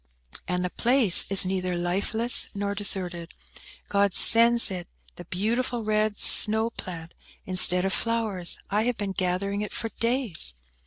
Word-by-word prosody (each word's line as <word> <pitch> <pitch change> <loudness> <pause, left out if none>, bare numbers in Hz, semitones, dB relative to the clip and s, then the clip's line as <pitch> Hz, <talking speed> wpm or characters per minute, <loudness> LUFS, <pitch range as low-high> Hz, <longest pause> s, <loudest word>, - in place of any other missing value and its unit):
"And 180 0 -4
the 180 - -6
place 240 -6 +3
is 195 -1 +5
neither 185 -1 -4
lifeless 200 +7 0
nor 200 0 -5
deserted. 185 -4 -3 0.5
God 200 -1 -1
sends 235 -1 +4
it 180 -1 -8 0.3
the 175 - -13
beautiful 230 +6 -4
red 215 -1 -2
snow 220 +2 +4
plant 170 -5 -10 0.3
instead 185 0 +4
of 195 - -2
flowers. 220 -7 0
I 210 +2 -1
have 245 -1 -3
been 205 -2 -5
gathering 190 +2 -4
it 210 - -7
for 225 - -5
days." 230 - -2
200 Hz, 145 wpm, -23 LUFS, 180-225 Hz, 0.5 s, is